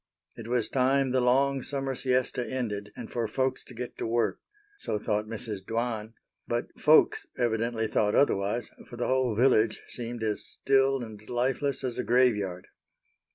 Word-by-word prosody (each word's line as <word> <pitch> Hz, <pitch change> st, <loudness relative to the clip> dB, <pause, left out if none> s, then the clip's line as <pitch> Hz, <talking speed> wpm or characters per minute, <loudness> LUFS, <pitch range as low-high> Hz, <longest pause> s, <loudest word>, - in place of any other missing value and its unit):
It 115 Hz, -, -8 dB
was 120 Hz, -2 st, +1 dB
time 135 Hz, 0 st, +2 dB
the 130 Hz, 0 st, +2 dB
long 135 Hz, +2 st, +3 dB
summer 135 Hz, 0 st, -2 dB
siesta 130 Hz, -1 st, 0 dB
ended 105 Hz, -6 st, -3 dB
and -, -, -8 dB
for 120 Hz, -2 st, -1 dB
folks 130 Hz, +4 st, -1 dB
to 125 Hz, -, -12 dB
get 125 Hz, +1 st, -6 dB
to -, -, -2 dB
work, 115 Hz, +1 st, 0 dB, 0.4 s
so 105 Hz, -, -2 dB
thought 105 Hz, 0 st, -1 dB
Mrs. 110 Hz, -3 st, -5 dB
Dwan, 115 Hz, 0 st, -3 dB, 0.3 s
but 120 Hz, 0 st, -1 dB
"folks" 395 Hz, -, +5 dB
evidently 115 Hz, -1 st, 0 dB
thought 105 Hz, -1 st, +1 dB
otherwise, 105 Hz, -3 st, +1 dB, 0.2 s
for 120 Hz, -, -9 dB
the 120 Hz, -, -1 dB
whole 130 Hz, -3 st, +1 dB
village 115 Hz, -2 st, +3 dB
seemed 120 Hz, -1 st, -5 dB
as 105 Hz, -1 st, -1 dB
still 135 Hz, -1 st, +2 dB
and 110 Hz, -3 st, -9 dB
lifeless 130 Hz, +3 st, 0 dB
as 125 Hz, -2 st, -3 dB
a -, -, 0 dB
graveyard. 105 Hz, -8 st, +2 dB
120 Hz, 160 wpm, -28 LUFS, 110-130 Hz, 0.4 s, folks